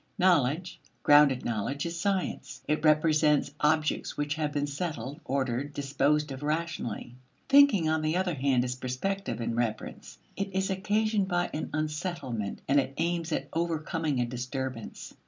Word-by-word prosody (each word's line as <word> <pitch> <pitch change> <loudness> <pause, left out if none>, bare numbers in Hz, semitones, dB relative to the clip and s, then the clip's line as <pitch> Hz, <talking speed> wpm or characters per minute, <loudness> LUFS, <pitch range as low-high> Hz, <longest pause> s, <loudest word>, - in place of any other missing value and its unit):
Knowledge, 175 -1 +2 0.2
grounded 145 -3 +6
knowledge, 120 +6 -2
is 170 0 -4
science; 195 0 -2
it 150 +1 0
represents 155 -2 +3
objects 155 0 +1
which 145 0 -1
have 155 -1 -2
been 145 0 0
settled, 145 -3 -4
ordered, 135 +1 -1
disposed 145 +1 +1
of 135 0 -6
rationally. 155 -5 -3 0.3
Thinking, 275 - +6
on 160 0 +1
the 155 +3 0
other 185 -2 0
hand, 130 -3 +2
is 125 0 -2
prospective 130 +11 -3
in 115 0 -2
reference. 115 -2 -3 0.2
It 195 -1 -4
is 190 0 +1
occasioned 210 +1 +1
by 175 -2 0
an 155 - -3
unsettlement 150 - -3
and 140 +1 +4
it 135 0 -2
aims 170 0 -1
at - - -1
overcoming 160 -3 -1
a 120 - +2
disturbance. 125 0 -5
150 Hz, 150 wpm, -29 LUFS, 135-170 Hz, 0.3 s, grounded